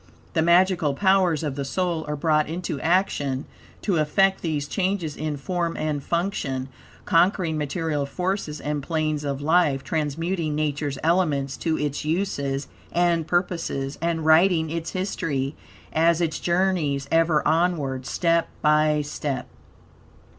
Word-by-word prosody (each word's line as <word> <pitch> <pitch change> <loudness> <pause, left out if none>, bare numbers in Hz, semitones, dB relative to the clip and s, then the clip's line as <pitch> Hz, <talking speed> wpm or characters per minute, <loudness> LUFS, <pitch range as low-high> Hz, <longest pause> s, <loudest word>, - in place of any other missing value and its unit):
The 165 - +2
magical 170 -3 +3
powers 190 -4 +3
of 150 -3 -2
the 140 - -3
soul 165 +3 -1
are 150 - -2
brought 155 0 +1
into 165 -4 -4
action 160 -7 +1 0.4
to 195 -5 +1
effect 190 +6 +2
these 150 -4 -2
changes 180 -3 -1
in 155 -1 -3
form 170 +3 -2
and 150 -2 -1
function, 145 -7 -2 0.4
conquering 170 -1 +2
material 150 -1 -2
forces 180 -1 -2
and 150 0 -2
planes 155 -1 -1
of 140 -1 -3
life, 155 -4 +3
transmuting 160 +1 -1
Nature's 145 -2 -1
elements 155 -5 +1
to 160 -2 -1
its 145 0 -2
uses 145 -5 -1 0.2
and 170 -2 +2
purposes, 165 -6 -1
and 165 -1 -1
writing 160 0 +4
its 165 0 -4
history, 155 -7 -2 0.4
as 165 +1 +3
it 170 -2 +1
journeys 170 -5 0
ever 165 -2 +3
onward, 155 -6 0
step 170 -1 +1
by 150 0 +3
step. 145 -2 -4
160 Hz, 130 wpm, -24 LUFS, 145-175 Hz, 0.4 s, writing